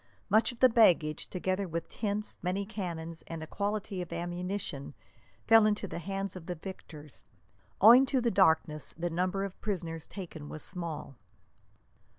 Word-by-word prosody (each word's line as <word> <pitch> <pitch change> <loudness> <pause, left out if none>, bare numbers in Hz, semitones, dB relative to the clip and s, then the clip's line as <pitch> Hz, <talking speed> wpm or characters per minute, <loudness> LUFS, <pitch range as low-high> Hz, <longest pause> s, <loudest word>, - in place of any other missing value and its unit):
Much 220 +4 +4
of 240 - -13
the 255 - +9
baggage, 180 -10 +3
together 185 +1 -2
with 170 0 -4
tents, 210 -1 -3
many 185 +3 -1
cannon, 170 -6 -5
and 165 -1 -6
a - - -5
quantity 200 +1 -3
of 175 - -7
ammunition, 175 -4 -4 0.5
fell 225 -1 +7
into 210 -1 0
the 170 - -5
hands 195 +2 -4
of 175 -3 -9
the 180 - -3
victors. 155 -4 -10 0.6
Owing 240 +6 +9
to 265 0 +2
the 235 -1 +1
darkness, 160 -5 +2
the 175 +1 -2
number 185 +3 0
of 195 -1 -7
prisoners 170 -6 -4
taken 165 -6 -8
was 155 - -4
small. 165 -7 -3
185 Hz, 160 wpm, -30 LUFS, 165-205 Hz, 0.6 s, the